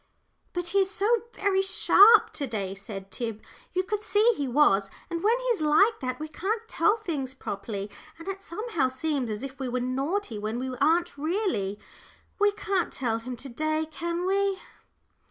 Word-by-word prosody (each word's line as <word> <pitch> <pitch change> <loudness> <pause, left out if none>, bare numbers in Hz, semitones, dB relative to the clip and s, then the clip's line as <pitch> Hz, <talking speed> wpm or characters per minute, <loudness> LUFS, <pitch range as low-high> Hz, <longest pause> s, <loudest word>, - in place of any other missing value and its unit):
"But 355 -1 -3
he 395 - +3
is 385 -1 +2
so 395 +1 -2 0.3
very 385 -1 +1
sharp 405 +3 +6
to 280 - -3
day," 200 -5 -3
said 195 -1 -9
Tib; 225 -3 -5 0.3
"you 370 - +1
could 415 +2 -2
see 430 +2 +3
he 285 - -2
was. 235 -8 +3 0.2
And 335 0 -3
when 450 +4 +4
he - - -7
is 460 -9 +1
like 310 +9 +4
that 255 -1 -3
we 310 - -4
can't 425 +9 -3
tell 425 0 +2
things 290 - -4
properly, 200 -3 -5 0.3
and 330 - -11
it 390 0 -4
somehow 345 - -1
seems 265 -1 -2
as 210 +3 -4
if 275 0 -7
we 265 -2 -2
were 250 +1 -1
naughty 265 - -2
when 215 +2 -3
we 255 +1 -3
aren't 325 0 +2
really. 310 - -1 0.6
We 415 0 +5
can't 395 -3 -1
tell 230 -4 -1
him 250 +2 -6
to 270 +3 -8
day, 310 +5 -1
can 340 +2 -3
we?" 390 0 +1
310 Hz, 185 wpm, -27 LUFS, 250-390 Hz, 0.6 s, sharp